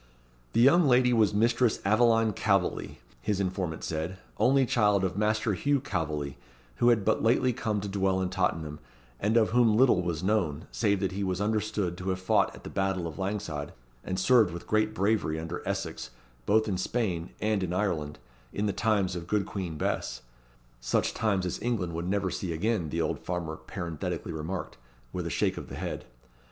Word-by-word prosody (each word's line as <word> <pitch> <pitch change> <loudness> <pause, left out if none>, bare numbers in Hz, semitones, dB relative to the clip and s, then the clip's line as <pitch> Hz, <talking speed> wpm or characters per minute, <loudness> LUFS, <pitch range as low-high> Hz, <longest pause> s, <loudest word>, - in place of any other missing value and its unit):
The - - +3
young 155 +6 +6
lady 125 -1 +4
was 110 -3 +4
Mistress 115 +2 +2
Aveline 115 +1 +4
Calveley, 100 -2 0 0.2
his 105 -2 -1
informant 90 -4 -2
said, 80 +4 -3 0.2
only 130 +4 +4
child 105 -6 +3
of 95 -2 -1
Master 110 +1 +1
Hugh 140 +9 +1
Calveley, 75 - -3 0.4
who 120 - +4
had 110 -5 +3
but - - +2
lately 125 +2 +3
come 110 -3 -1
to 100 - -4
dwell 95 -1 +1
in 95 -1 -1
Tottenham, 80 -5 -1 0.4
and 110 +3 +2
of 110 -2 +3
whom 115 -3 +4
little 120 -7 +5
was 85 -2 -3
known, 90 -7 0
save 100 -4 +1
that 95 - 0
he 100 +1 -3
was 95 -1 -1
understood 105 -4 -1
to 95 +1 -3
have 95 0 -1
fought 95 - +2
at - - -14
the - - -7
battle 95 -2 0
of 80 0 -6
Langside, 90 -7 -3 0.3
and 95 - -3
served 110 -2 +5
with 85 0 -7
great 110 0 +1
bravery, 100 -6 +1
under 80 +2 -5
Essex, - - -3 0.4
both 110 +1 +3
in 95 -3 -1
Spain 95 -6 -1
and 105 -2 +1
in 90 -2 -2
Ireland, 85 -6 -1 0.3
in 105 - -2
the 100 - 0
times 100 -3 +1
of 85 -1 -6
good 105 +1 +1
Queen 90 -6 -5
Bess - - -2 0.6
such - - 0
times 100 -4 0
as 90 - -3
England 105 -8 -1
would 85 +2 -3
never 95 -2 0
see 90 - -3
again, 95 -1 0
the 85 +2 -1
old - - -1
farmer 85 -3 -3
parenthetically 80 0 -5
remarked, 80 +4 -5 0.4
with - - -3
a - - -2
shake - - 0
of - - -7
the - - -7
head. - - -5
95 Hz, 190 wpm, -28 LUFS, 85-110 Hz, 0.6 s, young